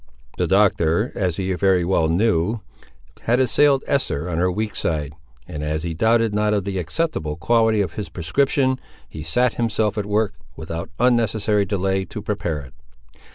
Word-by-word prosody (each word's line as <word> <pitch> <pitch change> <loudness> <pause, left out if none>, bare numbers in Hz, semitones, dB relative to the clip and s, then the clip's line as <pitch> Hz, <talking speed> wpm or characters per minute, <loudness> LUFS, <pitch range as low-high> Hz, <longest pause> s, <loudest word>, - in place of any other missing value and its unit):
The - - +1
Doctor, 95 0 +2
as 90 -4 -1
he 95 -1 -1
very 90 -1 +2
well 85 -3 +2
knew, 105 +3 +1 0.6
had 120 +2 +3
assailed 135 +2 +3
Esther 90 - -1
on 80 - -1
her 90 +1 +2
weak 105 +3 -3
side; 75 -4 -2 0.3
and, 75 -1 -6
as 75 +1 -2
he 85 -1 -3
doubted 115 +5 +2
not 105 0 +1
of 100 - 0
the 95 0 -3
acceptable 90 - -2
quality 110 +5 +2
of 90 -5 -2
his 105 - -5
prescription, 130 - +1 0.3
he 75 - -9
sat 120 +11 +1
himself 110 -2 0
at 100 - -3
work, 105 0 +1 0.2
without 80 +1 -6
unnecessary 110 -4 +2
delay, 95 -1 0
to - - -7
prepare 100 -7 -3
it. 65 -2 -13
100 Hz, 165 wpm, -22 LUFS, 85-110 Hz, 0.6 s, had